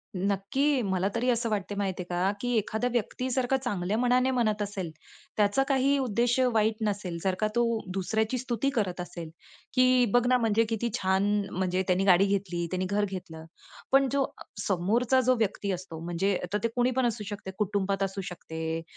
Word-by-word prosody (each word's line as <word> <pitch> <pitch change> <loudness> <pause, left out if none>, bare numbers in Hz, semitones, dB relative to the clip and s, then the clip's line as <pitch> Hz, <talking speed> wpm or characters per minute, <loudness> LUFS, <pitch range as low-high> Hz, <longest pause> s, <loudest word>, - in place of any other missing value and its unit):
नक्की. 200 +9 +1
मला 190 -3 0
तरी 245 +2 +1
असं 235 -1 +1
वाटते 205 -1 -2
माहिती 190 -2 -2
आहे - - -15
का, 180 +2 +1
की 245 -1 0
एखादा 220 +3 0
व्यक्ती 240 +2 -2
जर 255 0 +1
का 270 - +3
चांगल्या 205 -6 -2
मनाने 250 +1 +3
म्हणत 215 -4 +1
असेल, 200 -4 -3 0.5
त्याचा 210 +6 +3
काही 275 0 +3
उद्देश 245 0 +1
वाईट 220 0 +2
नसेल, 195 -4 -3
जर 190 -1 +1
का 215 - +2
तो 240 - +4 0.3
दुसऱ्याची 220 +5 0
स्तुती 245 +1 -1
करत 185 -4 0
असेल, 170 -2 -7 0.4
की 255 -1 +5
"बघ 245 0 +4
ना 255 0 +4
म्हणजे 225 -1 +2
किती 230 +1 -1
छान! 190 +1 +1 0.3
म्हणजे 185 0 0
त्यांनी 185 +1 +2
गाडी 190 0 +6
घेतली, 190 -4 -1
त्यांनी 185 0 -1
घर 205 +2 +1
घेतलं." 170 -5 -7 0.5
पण 270 0 +5
जो 280 -1 +2
अ, - - -8 0.2
समोरचा 220 +8 +2
जो 255 +1 +3
व्यक्ती 205 -2 -1
असतो 180 -3 -5
म्हणजे 180 +3 0 0.2
तर - - +3
ते - - +3
कुणी 245 0 +2
पण 255 0 +1
असू 230 -2 -1
शकते, 205 -2 -6
कुटुंबात 200 -1 0
असू 195 0 -3
शकते 160 -2 -4
205 Hz, 185 wpm, -28 LUFS, 190-245 Hz, 0.5 s, गाडी